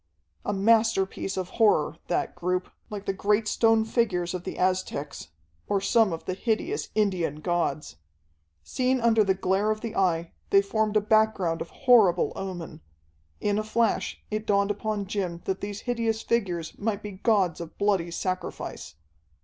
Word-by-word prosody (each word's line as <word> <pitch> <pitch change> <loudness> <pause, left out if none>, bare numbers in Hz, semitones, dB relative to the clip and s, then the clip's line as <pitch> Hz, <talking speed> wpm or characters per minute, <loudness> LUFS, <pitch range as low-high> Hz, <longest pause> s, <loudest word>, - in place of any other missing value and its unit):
A - - -1
masterpiece 205 -2 +2
of 185 -1 -3
horror, 165 -7 +3
that 175 - -1
group, 180 +1 -2 0.2
like 205 -2 -6
the 195 - 0
great 210 +2 +1
stone 225 0 +3
figures 185 -7 0
of 180 -1 -5
the - - -5
Aztecs, 180 - -1 0.4
or 200 - +1
some 215 +1 +3
of 165 - -5
the 185 - -2
hideous 240 - -2
Indian 185 -8 +1
gods. 155 - -2 0.7
Seen 255 - 0
under 225 -2 +4
the 195 -2 +2
glare 190 +2 +1
of 215 0 -1
the 230 -2 -5
Eye, 170 -3 +1 0.2
they 195 0 +5
formed 215 +1 +1
a - - +3
background 210 -6 +2
of - - -5 0.2
horrible 210 -9 +5
omen. 185 -4 -6 0.6
In 205 0 0
a - - -1
flash 225 +1 0
it 215 0 -3
dawned 200 0 +2
upon 205 0 -2
Jim 185 -4 -3
that 190 0 -2
these 205 0 -5
hideous 230 -2 -1
figures 180 -8 -1
might 210 -1 -2
be 210 - -5
gods 190 -4 +1
of 170 -1 -9
bloody 200 -4 +1
sacrifice. 185 - -4
200 Hz, 160 wpm, -26 LUFS, 180-220 Hz, 0.7 s, they